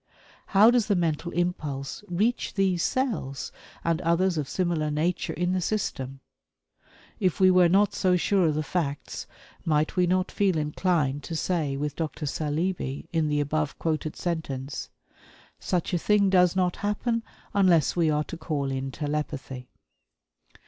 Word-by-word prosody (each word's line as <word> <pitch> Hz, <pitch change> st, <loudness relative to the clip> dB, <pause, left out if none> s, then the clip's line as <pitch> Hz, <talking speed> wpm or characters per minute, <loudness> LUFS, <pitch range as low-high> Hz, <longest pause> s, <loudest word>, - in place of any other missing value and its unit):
How 210 Hz, +4 st, +6 dB
does 245 Hz, -3 st, +2 dB
the 205 Hz, -, +2 dB
mental 170 Hz, -1 st, -1 dB
impulse 155 Hz, -5 st, -2 dB
reach 210 Hz, +8 st, 0 dB
these 190 Hz, -3 st, +2 dB
cells 180 Hz, -, -1 dB, 0.3 s
and 165 Hz, +1 st, 0 dB
others 175 Hz, +2 st, +2 dB
of 150 Hz, -3 st, -2 dB
similar 170 Hz, -4 st, 0 dB
nature 160 Hz, +4 st, -1 dB
in 180 Hz, +1 st, 0 dB
the 185 Hz, -, 0 dB
system? 135 Hz, -9 st, -3 dB, 1.0 s
If 185 Hz, -5 st, +1 dB
we 185 Hz, -1 st, +6 dB
were 180 Hz, -1 st, +5 dB
not 200 Hz, +2 st, +4 dB
so 185 Hz, -2 st, +2 dB
sure 185 Hz, 0 st, +2 dB
of 155 Hz, -, +1 dB
the 155 Hz, -, 0 dB
facts, 145 Hz, -4 st, -3 dB, 0.4 s
might 155 Hz, -1 st, +1 dB
we 180 Hz, -1 st, +3 dB
not 185 Hz, +1 st, +1 dB
feel 195 Hz, -4 st, +1 dB
inclined 150 Hz, -2 st, 0 dB
to 165 Hz, -, -4 dB
say 155 Hz, -5 st, -1 dB
with 145 Hz, 0 st, -3 dB
Dr. 155 Hz, -2 st, -3 dB
Saleeby, 150 Hz, 0 st, -2 dB
in 160 Hz, -2 st, +2 dB
the 150 Hz, 0 st, +1 dB
above 150 Hz, +1 st, -1 dB
quoted 155 Hz, -1 st, -2 dB
sentence: 145 Hz, -5 st, -4 dB, 0.7 s
"Such 180 Hz, 0 st, -1 dB
a 175 Hz, -, +2 dB
thing 200 Hz, +1 st, +3 dB
does 180 Hz, -1 st, +4 dB
not 180 Hz, -1 st, +1 dB
happen 230 Hz, +3 st, -1 dB, 0.3 s
unless 180 Hz, -7 st, +4 dB
we 170 Hz, -2 st, +3 dB
are 150 Hz, 0 st, +1 dB
to 170 Hz, -, -8 dB
call 145 Hz, -5 st, -2 dB
in 135 Hz, 0 st, -3 dB
telepathy." 145 Hz, -3 st, -4 dB
170 Hz, 155 wpm, -26 LUFS, 150-185 Hz, 1.0 s, How